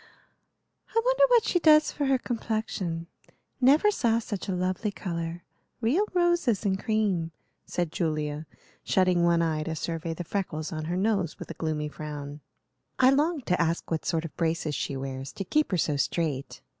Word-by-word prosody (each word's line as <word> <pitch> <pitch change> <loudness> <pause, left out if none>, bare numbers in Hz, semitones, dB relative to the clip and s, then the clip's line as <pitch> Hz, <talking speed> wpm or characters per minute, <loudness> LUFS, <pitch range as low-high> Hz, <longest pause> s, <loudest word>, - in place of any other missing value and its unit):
"I 455 - +5
wonder - - +4
what 485 -3 +5
she 355 - +1
does 305 -2 +6
for 285 -2 -1
her 270 -1 +4
complexion. 220 -8 -3 0.6
Never 290 +11 +5
saw 235 - +2
such 210 -4 -4
a 190 - 0
lovely 185 +4 -1
color. 170 -3 -4 0.4
Real 285 - +2
roses 345 - +2
and 190 -1 +1
cream," 200 -7 0 0.4
said 175 -3 -2
Julia, 155 -2 -2 0.4
shutting 185 -2 +3
one 170 -1 +4
eye 155 -2 0
to 160 +1 -3
survey 165 +1 -3
the 175 - -5
freckles 160 -4 -3
on 155 -1 -4
her 175 +3 -2
nose, 195 -5 0
with - - -8
a - - -4
gloomy 155 -2 -2
frown. 150 -1 -7 0.6
"I 260 0 +6
longed 295 0 +1
to 180 -1 +1
ask 165 +1 -1
what 160 - 0
sort 165 -1 -1
of 160 - -8
braces 160 -2 -1
she 140 0 -2
wears, 135 0 -5
to 195 - -4
keep 305 +9 +1
her 185 - +1
so 150 -3 +1
straight. 140 0 -2
175 Hz, 175 wpm, -27 LUFS, 160-230 Hz, 0.6 s, does